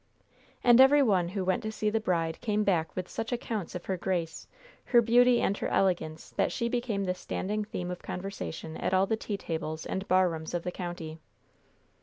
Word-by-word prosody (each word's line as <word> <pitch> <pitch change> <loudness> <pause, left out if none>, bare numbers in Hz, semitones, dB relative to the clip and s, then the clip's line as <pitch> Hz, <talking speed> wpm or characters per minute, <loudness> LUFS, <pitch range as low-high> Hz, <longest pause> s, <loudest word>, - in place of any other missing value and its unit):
And 240 +1 +7
every 280 +2 +7
one 190 -8 +2
who 190 0 -3
went 185 -1 +1
to 215 - -4
see 215 -1 -1
the 225 - +1
bride 165 -6 -1
came 215 -3 +1
back 175 -5 0
with 185 -1 -3
such 225 - -4
accounts 225 -7 -3
of 180 - -6
her 190 - -1
grace, 175 -3 -3 0.4
her 240 - +5
beauty 240 +1 +5
and 200 - +1
her - - -1
elegance 165 -5 0
that - - 0
she 235 - -1
became 235 -4 -1
the 180 -1 0
standing 210 +3 -3
theme 180 -4 -4
of 180 - -6
conversation 180 -4 -6
at 185 - 0
all 190 +1 +4
the 220 - 0
tea 215 -2 -4
tables 160 -3 -4
and 190 +1 -3
bar 185 0 +4
rooms 160 0 -4
of 170 - -2
the 180 - -3
county. 175 -3 -6
190 Hz, 205 wpm, -29 LUFS, 175-220 Hz, 0.4 s, And